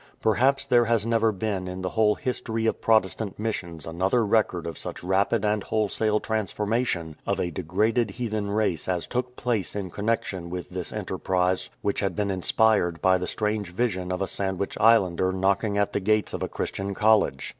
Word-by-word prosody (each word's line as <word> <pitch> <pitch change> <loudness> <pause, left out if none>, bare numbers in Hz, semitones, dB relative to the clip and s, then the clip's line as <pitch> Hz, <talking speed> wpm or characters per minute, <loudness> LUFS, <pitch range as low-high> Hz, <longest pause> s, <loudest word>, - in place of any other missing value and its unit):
Perhaps 135 +5 +2
there 120 -3 +4
has 115 -2 +1
never 115 -1 +2
been 100 -2 -3
in 90 0 -5
the 90 - -1
whole 105 -2 +3
history 115 -4 -3
of 110 - 0
Protestant 110 -2 +1
missions 85 -8 -4
another 95 +8 +1
record 100 -5 +1
of 85 -2 -4
such - - -7
rapid 100 +4 +1
and 105 0 +1
wholesale 110 0 +1
transformation 105 -6 -1
of - - 0
a 85 - -1
degraded 105 +7 0
heathen 110 -2 -3
race 100 -6 0
as 90 -2 -1
took 125 0 -3
place 115 -8 -2
in 95 -3 -4
connexion 100 -4 -2
with 90 +1 -6
this 90 -1 -4
enterprise 90 0 -1
which 100 - 0
had 100 - -1
been 105 -2 0
inspired 95 -2 +2
by 95 +3 +3
the 90 - -3
strange 105 -3 -1
vision 90 -2 -1
of 90 +1 -1
a - - -2
Sandwich 95 0 -3
Islander 95 -5 +4
knocking 100 +2 +1
at 100 0 +1
the - - +1
gates 105 +2 +1
of - - -4
a - - -2
Christian 100 0 -4
college. 110 +1 +2
100 Hz, 180 wpm, -26 LUFS, 95-110 Hz, -, there